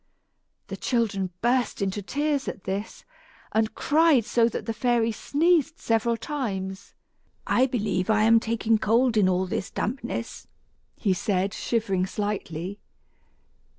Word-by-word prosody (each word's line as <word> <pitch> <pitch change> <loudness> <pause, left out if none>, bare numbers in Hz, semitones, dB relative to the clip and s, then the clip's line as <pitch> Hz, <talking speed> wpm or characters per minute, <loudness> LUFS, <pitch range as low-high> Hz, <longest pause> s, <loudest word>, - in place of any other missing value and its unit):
The - - -5
children 210 -6 0
burst 245 -1 +1
into 200 +1 -1
tears 285 +5 -1
at 195 - -5
this, 195 +3 -5 0.5
and 220 0 0
cried 305 -6 +3
so 235 0 +3
that - - -5
the 225 - -2
fairy 235 0 +1
sneezed 320 +6 +1
several 230 +1 +1
times. 200 -8 -4 0.5
"I 260 +2 +3
believe 205 -7 -1
I 215 -1 +4
am 225 +1 +6
taking 225 -1 +1
cold 230 +3 +2
in 200 -3 +4
all 185 0 +1
this 185 +1 -3
dampness," 235 0 -4 0.5
he 195 -4 +1
said, 195 +1 -1
shivering 195 -7 -1
slightly. 200 -2 -4
225 Hz, 130 wpm, -26 LUFS, 195-245 Hz, 0.5 s, am